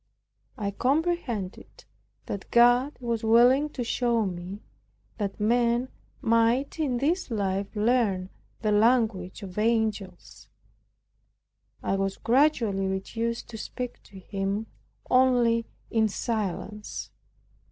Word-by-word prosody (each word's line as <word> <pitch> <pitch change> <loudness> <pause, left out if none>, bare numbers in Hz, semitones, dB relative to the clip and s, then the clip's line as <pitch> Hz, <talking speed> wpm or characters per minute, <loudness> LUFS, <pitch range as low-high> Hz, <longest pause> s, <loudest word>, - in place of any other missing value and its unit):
I 200 -3 -2
comprehended 260 - -2 0.4
that 200 - -6
God 245 +4 +4
was 235 -2 -2
willing 245 +6 +5
to 260 -4 -4
show 235 -1 +1
me 185 +2 -6 0.6
that 200 -1 -3
men 235 +3 +2 0.3
might 230 +6 +2
in 270 -6 0
this 320 +8 0
life 200 -2 -2
learn 210 -4 +1 0.3
the 215 - +1
language 215 -4 +2
of 190 +1 -6
angels. 215 -5 -1 1.3
I 195 - 0
was 195 0 -1
gradually 230 -7 +2
reduced 225 +5 -3
to 220 -2 -7
speak 250 +2 -6
to 200 - -14
him 195 +2 -3 0.4
only 245 -3 +3 0.2
in 220 -1 +3
silence. 210 -1 -4
225 Hz, 105 wpm, -27 LUFS, 200-245 Hz, 1.3 s, willing